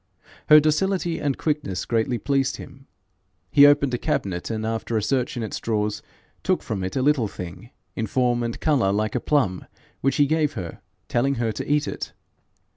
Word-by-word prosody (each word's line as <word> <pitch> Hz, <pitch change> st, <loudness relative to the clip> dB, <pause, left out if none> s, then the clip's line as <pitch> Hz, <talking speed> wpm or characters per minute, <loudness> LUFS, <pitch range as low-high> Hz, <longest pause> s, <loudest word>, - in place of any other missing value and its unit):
Her 150 Hz, 0 st, +10 dB
docility 170 Hz, +3 st, +1 dB
and 140 Hz, -3 st, -1 dB
quickness 145 Hz, -, -2 dB
greatly 115 Hz, +1 st, 0 dB
pleased 135 Hz, +1 st, 0 dB
him. 135 Hz, +1 st, -12 dB, 0.6 s
He 145 Hz, 0 st, +8 dB
opened 145 Hz, -2 st, +3 dB
a 125 Hz, -, 0 dB
cabinet, 90 Hz, -3 st, -2 dB
and 110 Hz, -1 st, -3 dB
after 115 Hz, 0 st, -2 dB
a 105 Hz, -, 0 dB
search 130 Hz, +1 st, 0 dB
in 120 Hz, -, -2 dB
its 110 Hz, -, -4 dB
drawers, 105 Hz, -2 st, -1 dB, 0.4 s
took -, -, 0 dB
from 100 Hz, -4 st, -3 dB
it 95 Hz, -, -4 dB
a 130 Hz, -, +1 dB
little 140 Hz, -6 st, +3 dB
thing, 90 Hz, +4 st, -8 dB, 0.3 s
in 110 Hz, -, -2 dB
form 120 Hz, +1 st, +1 dB
and 115 Hz, -1 st, -3 dB
colour 135 Hz, -11 st, +2 dB
like 105 Hz, +1 st, 0 dB
a -, -, 0 dB
plum, 115 Hz, -12 st, 0 dB, 0.4 s
which 135 Hz, 0 st, +1 dB
he 145 Hz, -, +4 dB
gave 155 Hz, 0 st, +1 dB
her, 85 Hz, -3 st, -7 dB, 0.3 s
telling 135 Hz, +3 st, +1 dB
her 115 Hz, -2 st, 0 dB
to 110 Hz, -, -4 dB
eat 150 Hz, 0 st, +2 dB
it. -, -, -5 dB
120 Hz, 190 wpm, -24 LUFS, 110-145 Hz, 0.6 s, Her